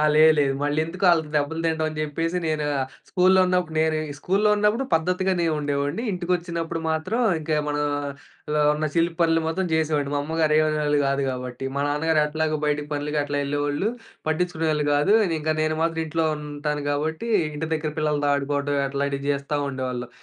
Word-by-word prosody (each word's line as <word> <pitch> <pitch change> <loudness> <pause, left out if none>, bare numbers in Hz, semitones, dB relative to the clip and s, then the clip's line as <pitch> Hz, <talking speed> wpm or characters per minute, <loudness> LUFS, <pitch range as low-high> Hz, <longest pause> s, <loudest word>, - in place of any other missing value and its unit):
లేదు. 155 +1 +7
లేదు. 140 -2 +2
మల్లెందుకు 160 +6 0
ఆళ్ళకి 160 -3 +3
దెబ్బలు 150 +2 0
తింటం 160 -1 +1
అనిచెప్పేసి, 155 +3 -2
నేను 155 -2 0
ఆహ్, 135 -1 -2 0.2
స్కూల్లో 185 +1 +4
ఉన్నప్పుడు 180 -3 0
నేను 160 0 +2 0.2
స్కూల్లో 200 +7 +2
ఉన్నప్పుడు 210 +5 +2
పద్ధతిగా‌నే 180 +1 +1
ఉండేవాడ్ని. 145 - -1
ఇంటికొచ్చినప్పుడు 170 -2 -2
మాత్రం 160 +10 -1 0.2
ఇంకా 155 0 -1
మనలో 145 +1 -3
ఉన్న 155 +1 -1
చిలి‌ప్పనులు 165 -1 +2
మాత్రం 185 +3 -1
చేసేవాడిని. 150 -3 0
మా - - +1
అమ్మగారు 160 0 +1
ఏమనేవాళ్ళు 150 -1 +1
కాదు 140 0 0
కాబట్టి. 125 0 -6
మా - - 0
నాన్నగారు 155 +2 +2
ఎట్లాగో 155 0 -1
బయటికి 150 0 -1
పనులకి 150 +1 -1
అట్లా 145 0 -2
యెళ్ళేవాళ్ళు, 145 +6 -1 0.4
పట్టిచ్చుకునేవాళ్ళు 160 -2 0
గాదు. 170 +9 +4 0.2
ఇంకా 155 +1 0
నేను 155 0 +1
మాత్రం 165 0 0
ఇంట్లో 160 +1 0
ఉంటాను 150 0 -4
కాబట్టి 160 +10 -2 0.3
ఇంటి 160 +2 -3
దగ్గర 155 -1 -3
పిల్లలతో 150 -1 +1
ఆడుకోవడం 145 0 -1
అట్లాంటివి 140 0 -2
చేస్తా 140 +1 -3
ఉండేవాళ్ళం. 130 -2 -4
155 Hz, 150 wpm, -24 LUFS, 145-165 Hz, 0.4 s, లేదు